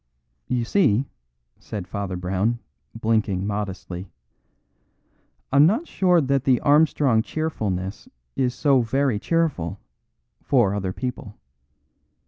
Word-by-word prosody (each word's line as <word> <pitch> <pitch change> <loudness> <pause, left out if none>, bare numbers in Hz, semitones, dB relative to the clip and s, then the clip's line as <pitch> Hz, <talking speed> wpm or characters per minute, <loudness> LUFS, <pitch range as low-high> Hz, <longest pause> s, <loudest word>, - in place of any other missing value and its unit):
"You 125 -2 0
see," 140 - +2 0.5
said 100 -4 -6
Father 100 -3 -4
Brown, 95 +6 0 0.4
blinking 110 -4 0
modestly, 100 -3 -4 1.4
"I'm 140 +3 +7
not 235 - 0
sure 180 -2 +3
that 135 -3 +1
the 130 -3 +3
Armstrong 145 -5 +4
cheerfulness 105 - -3 0.3
is 125 -1 0
so 135 -1 +3
very 130 -1 0
cheerful 155 - -1 0.6
for 100 - +2
other 95 -2 -2
people. 115 -2 -5
115 Hz, 105 wpm, -23 LUFS, 100-140 Hz, 1.4 s, I'm